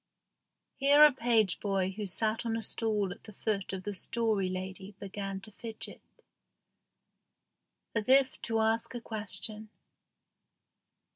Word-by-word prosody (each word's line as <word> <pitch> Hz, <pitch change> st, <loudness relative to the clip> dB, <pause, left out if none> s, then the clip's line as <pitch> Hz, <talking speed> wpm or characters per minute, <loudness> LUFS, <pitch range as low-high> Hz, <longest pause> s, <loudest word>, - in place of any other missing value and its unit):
Here 285 Hz, +2 st, +7 dB
a 300 Hz, -, +7 dB
page 230 Hz, -6 st, +2 dB
boy 195 Hz, -2 st, 0 dB
who 205 Hz, +1 st, -4 dB
sat 215 Hz, +4 st, +2 dB
on 225 Hz, -1 st, -1 dB
a 225 Hz, -, -3 dB
stool 210 Hz, -3 st, 0 dB
at -, -, -10 dB
the 215 Hz, -, -11 dB
foot 200 Hz, -1 st, -2 dB
of 190 Hz, -1 st, -5 dB
the 205 Hz, -, -3 dB
Story 210 Hz, -1 st, 0 dB
Lady 190 Hz, +2 st, -6 dB
began 195 Hz, -1 st, -5 dB
to 215 Hz, -, -9 dB
fidget, 225 Hz, +1 st, -8 dB, 1.9 s
as 225 Hz, +1 st, -1 dB
if 270 Hz, 0 st, +4 dB
to 225 Hz, -1 st, 0 dB
ask 225 Hz, +2 st, 0 dB
a -, -, -2 dB
question. 215 Hz, 0 st, -4 dB
215 Hz, 135 wpm, -31 LUFS, 195-225 Hz, 1.9 s, Here